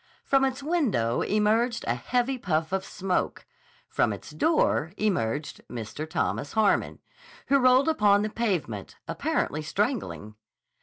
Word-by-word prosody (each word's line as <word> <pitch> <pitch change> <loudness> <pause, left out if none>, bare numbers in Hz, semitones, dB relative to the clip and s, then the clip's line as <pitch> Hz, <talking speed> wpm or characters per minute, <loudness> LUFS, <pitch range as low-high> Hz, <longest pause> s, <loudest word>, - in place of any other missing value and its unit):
From 270 -1 +3
its 265 0 -1
window 245 - +1
emerged 225 +3 +1
a - - +2
heavy 250 +1 -1
puff 160 -5 -1
of 190 0 0
smoke. 190 -1 -2 0.4
From - - +1
its - - -8
door 295 - +1
emerged 150 - -1
Mr. 120 +7 -6
Thomas 145 - -2
Harmon, 220 -2 +2 0.5
who 275 0 +5
rolled 255 +2 +5
upon 210 -9 +4
the 215 - -1
pavement 175 - -2
apparently 155 - -1
strangling. 190 - -2
210 Hz, 130 wpm, -27 LUFS, 155-255 Hz, 0.5 s, who